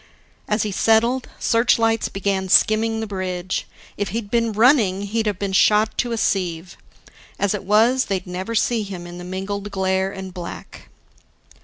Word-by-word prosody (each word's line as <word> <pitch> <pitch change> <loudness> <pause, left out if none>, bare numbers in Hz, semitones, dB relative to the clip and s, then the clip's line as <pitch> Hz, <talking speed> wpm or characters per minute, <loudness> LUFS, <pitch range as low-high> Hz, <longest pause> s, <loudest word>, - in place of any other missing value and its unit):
As 210 0 +1
he 210 - -2
settled, 230 +5 +2
searchlights 230 -1 +2
began 195 -1 -2
skimming 220 +3 +3
the - - -2
bridge. 185 -3 -4 0.3
If 205 - -2
he'd 205 +1 -5
been 230 -1 +1
running, 215 -4 +3
he'd 220 +2 -1
have 205 -3 -1
been 195 -1 -3
shot 210 +3 +3
to 240 - 0
a 230 - -1
sieve. 180 -4 -1 0.6
As 200 0 0
it 205 - -4
was, 230 +6 +3
they'd 195 -2 -3
never 185 +5 -5
see 230 +1 +1
him 190 -4 -7
in 175 0 -9
the - - -8
mingled 195 +3 -5
glare 190 -1 0
and 190 -1 -8
black. 175 -1 -9
205 Hz, 165 wpm, -21 LUFS, 190-225 Hz, 0.6 s, skimming